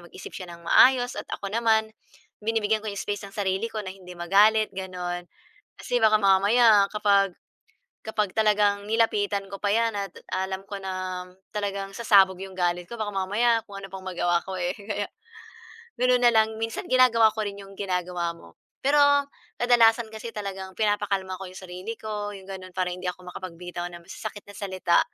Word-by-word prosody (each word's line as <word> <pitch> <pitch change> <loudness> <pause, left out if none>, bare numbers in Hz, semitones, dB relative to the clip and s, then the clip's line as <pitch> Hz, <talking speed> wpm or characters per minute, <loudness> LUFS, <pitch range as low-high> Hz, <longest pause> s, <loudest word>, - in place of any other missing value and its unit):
mag-isip - - -10
siya 180 -2 -7
nang 170 0 -11
maayos 250 +6 +5
at - - -13
ako 200 0 -6
naman, 220 -1 +2 0.5
binibigyan 220 0 +1
ko 220 - -6
'yong 200 - -5
space 205 0 -3
ang 195 - -16
sarili 195 +2 0
ko 215 -2 -5
na 185 - -5
hindi 180 -2 -12
magalit 205 +5 +4
gano'n. 180 -2 -5 0.5
Kasi 245 -1 -1
baka 215 -1 +5
mamaya 205 +1 +5
kapag 200 -3 +2 0.7
kapag 210 -3 -1
talagang 210 -2 +2
nilapitan 210 -3 +1
ko 195 - -6
pa 205 - 0
yan 230 0 +2
at 200 -1 -2 0.2
alam 190 +1 -2
ko 195 0 -7
na 185 -1 -4 0.3
talagang 200 -1 -3
sasabog 195 -5 +4
yung 190 -1 -8
galit 175 -1 0
ko, 235 - -7
baka 210 -2 -3
mamaya 220 +5 +2
kung 200 - -9
ano 195 -1 -10
pang 190 - -6
magawa 175 -2 +1
ko 190 -1 -4
eh. 180 0 -1
Kaya 205 0 -4 1.0
ganun 250 0 +4
na 240 -1 +6
lang, 220 0 +3
minsan 225 0 -3
ginagawa 230 -4 +6
ko 220 -1 -2
rin 200 0 -5
yung 195 0 -14
ginagawa 180 -3 -2
mo. 85 - -17 0.2
Pero 285 +2 +3 0.6
kadalasan 235 -2 +4
kasi 220 +1 -7
talagang 190 -2 -6
pinapakalma 200 -3 0
ko 190 - -7
yung 185 +1 -10
sarili 185 +5 -6
ko, 210 -1 -5
yung 190 0 -12
ganun. 185 -1 -8
Para 185 -1 0
hindi 180 +1 -6
ako 180 0 -6
makapagbitaw 175 -1 -6
ng 175 -1 -9
masasakit 205 +1 -7
na 205 - -11
salita. 185 -3 +2
200 Hz, 180 wpm, -26 LUFS, 185-220 Hz, 1.0 s, na